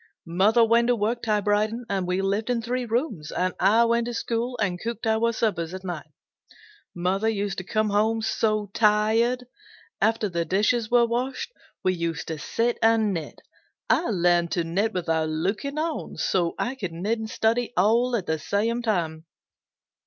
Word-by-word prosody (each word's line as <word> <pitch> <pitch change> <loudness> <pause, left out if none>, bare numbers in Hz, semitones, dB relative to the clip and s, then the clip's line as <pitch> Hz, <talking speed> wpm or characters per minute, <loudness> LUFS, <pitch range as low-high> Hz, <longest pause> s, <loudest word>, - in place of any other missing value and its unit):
Mother 200 +7 +4
went 235 +1 +3
to 245 - +3
work 230 +2 -1
typewriting 215 +2 0
and 190 -2 -1
we 180 +2 0
lived 200 +4 -1
in 245 -1 +1
three 245 +2 -2
rooms, 225 - -2
and 185 +1 -1
I 215 +5 +5
went 235 0 +1
to 240 - -4
school 235 +2 -2
and 185 -4 -1
cooked 230 -1 -4
our 225 +1 +2
suppers 185 -7 -1
at 190 - -8
night. 175 -5 -5 0.9
Mother 190 +5 0
used 200 -3 -2
to - - -6
come 215 +2 0
home 220 +2 +1
so 215 -2 0
tired. 225 +3 +2 0.6
After 220 -1 +2
the 170 -3 -1
dishes 210 +6 +1
were 240 -1 +5
washed, 250 - -2 0.3
we 185 - +2
used 170 -2 -3
to 160 -2 -4
sit 235 +7 -1
and 225 -2 +3
knit. 160 -4 -6 0.5
I - - +2
learned 175 -3 +2
to 170 - 0
knit 195 +7 0
without 160 -4 -1
looking 200 - -2
on, 320 +1 -3
so 175 -3 0
I 245 - -1
could 190 -10 -5
knit 205 +7 -1
and 220 0 -5
study 230 +2 0
all 235 +6 +3
at 200 -6 -2
the 160 0 -1
same 225 +8 0
time. 170 -8 -1
215 Hz, 175 wpm, -25 LUFS, 185-230 Hz, 0.9 s, I